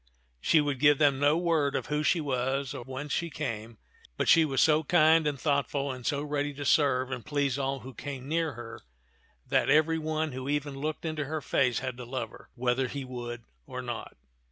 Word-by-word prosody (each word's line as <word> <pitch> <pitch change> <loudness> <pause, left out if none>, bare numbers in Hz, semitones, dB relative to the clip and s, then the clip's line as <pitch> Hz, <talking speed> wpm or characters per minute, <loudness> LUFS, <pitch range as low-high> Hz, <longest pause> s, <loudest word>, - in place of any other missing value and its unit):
She 155 - +4
would 145 -3 -2
give 145 0 +5
them 140 -2 +3
no 145 +2 +4
word 165 -5 +1
of - - -1
who 150 0 -1
she 155 +3 +2
was 135 -1 -1
or - - -6
whence 135 +3 -6
she 170 - -1
came, 115 -7 -5 0.4
but - - 0
she 165 -1 +6
was 135 -3 -1
so 155 0 +4
kind 160 0 +4
and 145 -3 -2
thoughtful 140 -1 0
and 125 -2 -6
so 145 0 0
ready 145 -1 -2
to 145 0 -5
serve 130 -4 +3
and 125 -3 -4
please 140 -2 0
all 135 -1 -2
who 130 +3 -9
came 135 0 -7
near 165 +1 0
her 115 -1 -9 0.6
that - - +1
every 155 +3 +4
one 155 0 -1
who 130 +1 -5
even 145 -1 -1
looked 150 +4 -4
into 155 -2 -2
her 155 +3 -3
face 130 -4 +1
had 130 -2 -4
to 125 - -7
love 120 -2 -4
her, - - -15
whether 125 +1 +1
he 140 +1 -5
would 120 -2 -6 0.2
or - - -6
not. - - -6
140 Hz, 210 wpm, -29 LUFS, 130-150 Hz, 0.6 s, she